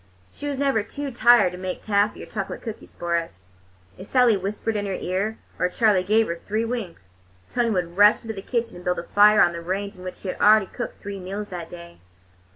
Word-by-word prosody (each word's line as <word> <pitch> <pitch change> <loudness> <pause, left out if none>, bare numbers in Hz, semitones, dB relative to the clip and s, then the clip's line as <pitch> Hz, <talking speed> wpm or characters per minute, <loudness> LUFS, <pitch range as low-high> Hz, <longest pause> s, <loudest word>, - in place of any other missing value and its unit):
She 290 - -6
was 285 -2 -2
never 275 -5 +2
too 280 +6 -6
tired 235 -5 +5
to 180 - -9
make 185 -1 -5
taffy 205 0 +1
or - - -8
chocolate 195 -3 -5
cookies 225 -2 -8
for 170 0 -2
us. 95 - -7 0.5
If 190 - -9
Sally 250 -4 +4
whispered 205 +3 -3
in 205 -1 -2
her 195 - -2
ear, 200 +5 -2 0.2
or 180 - +2
Charley 205 -2 +3
gave 215 +4 +3
her 170 -3 -4
three 215 +2 0
winks, 180 - -6 0.4
Tony 240 -1 +1
would 180 -4 -2
rush 205 +3 +6
into 225 -1 -5
the 195 - -7
kitchen 230 -2 -3
and 175 - -11
build 180 0 0
a - - -4
fire 210 +3 +6
in 175 - -1
the 170 - -6
range 200 +4 -3
on 180 - -12
which 185 - -6
she 190 - -7
had - - -5
already 215 -1 +6
cooked - - -7
three 200 -1 -6
meals 200 +3 -6
that 175 -3 -7
day. 170 -1 -11
200 Hz, 230 wpm, -24 LUFS, 180-220 Hz, 0.5 s, rush